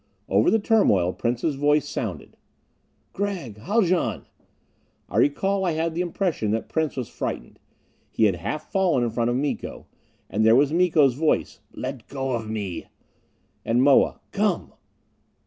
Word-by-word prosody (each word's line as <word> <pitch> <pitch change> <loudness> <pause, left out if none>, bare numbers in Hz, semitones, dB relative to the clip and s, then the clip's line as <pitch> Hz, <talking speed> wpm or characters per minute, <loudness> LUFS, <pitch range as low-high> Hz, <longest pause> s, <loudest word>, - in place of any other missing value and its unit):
Over - - +3
the 225 - +4
turmoil 105 - +3
Prince's 120 +6 -1
voice 145 +1 +2
sounded: 95 - -5 0.8
"Gregg 180 - -4
Haljan!" 185 - 0 0.8
I - - -4
recall 195 +7 +2
I 175 -3 +1
had 160 +1 -1
the 170 - -1
impression 175 - -1
that 110 +2 -1
Prince 160 -3 -1
was 125 -4 -3
frightened; - - -5 0.5
he - - 0
had 100 -5 +3
half 155 - -5
fallen 180 -10 +2
in 120 - -1
front 115 +1 0
of 120 - 0
Miko. 140 +2 -3 0.4
And 105 +2 0
there 110 +1 +6
was 145 +3 +3
Miko's 165 -6 +4
voice: 155 +5 0
"Let 130 -4 -6
go 135 -1 -3
of 115 -3 -3
me!" 100 -5 -4 0.8
And 120 +3 +2
Moa: 140 -1 +4
"Come!" - - -1
140 Hz, 145 wpm, -24 LUFS, 115-170 Hz, 0.8 s, there